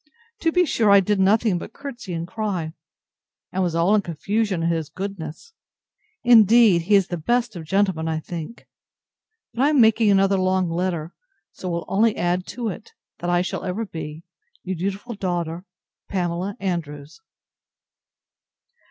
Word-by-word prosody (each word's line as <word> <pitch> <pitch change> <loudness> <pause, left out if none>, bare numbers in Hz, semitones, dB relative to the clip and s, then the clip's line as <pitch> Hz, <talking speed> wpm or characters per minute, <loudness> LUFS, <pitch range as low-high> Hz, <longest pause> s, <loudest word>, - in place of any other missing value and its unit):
To 325 - +1
be 360 +2 +3
sure 225 -8 +1
I 200 0 +8
did 200 +1 0
nothing 200 0 +3
but 220 - -9
courtesy 250 -8 -8
and 165 +1 -4
cry, 185 -6 -3 0.8
and 190 - -1
was 175 -3 0
all 170 +5 +3
in 215 - +4
confusion, 195 +2 -1
at 165 - +1
his 160 -3 -2
goodness. 190 - -7 0.7
Indeed 225 -5 +6
he 210 - +6
is 195 -2 +3
the 175 - -3
best 240 +5 0
of 165 -2 -7
gentlemen, 190 -2 +1
I 160 -1 -1
think! 170 +6 -8 0.9
But 240 - -2
I 285 - +4
am 300 -3 +3
making 220 -1 +5
another 195 0 +3
long 185 -2 +1
letter: 170 -2 -2 0.4
So 185 - -6
will 170 -1 -3
only 220 +2 +2
add 175 +1 0
to 240 -1 -4
it, 185 - -9 0.3
that 175 - -3
I 175 0 +2
shall - - -4
ever 195 +5 -3
be 160 -3 -7 0.4
Your 190 0 -3
dutiful 195 +7 -4
daughter, 175 -3 -3 0.4
PAMELA 180 +1 -2
ANDREWS. 155 - -5
190 Hz, 160 wpm, -23 LUFS, 170-215 Hz, 0.9 s, I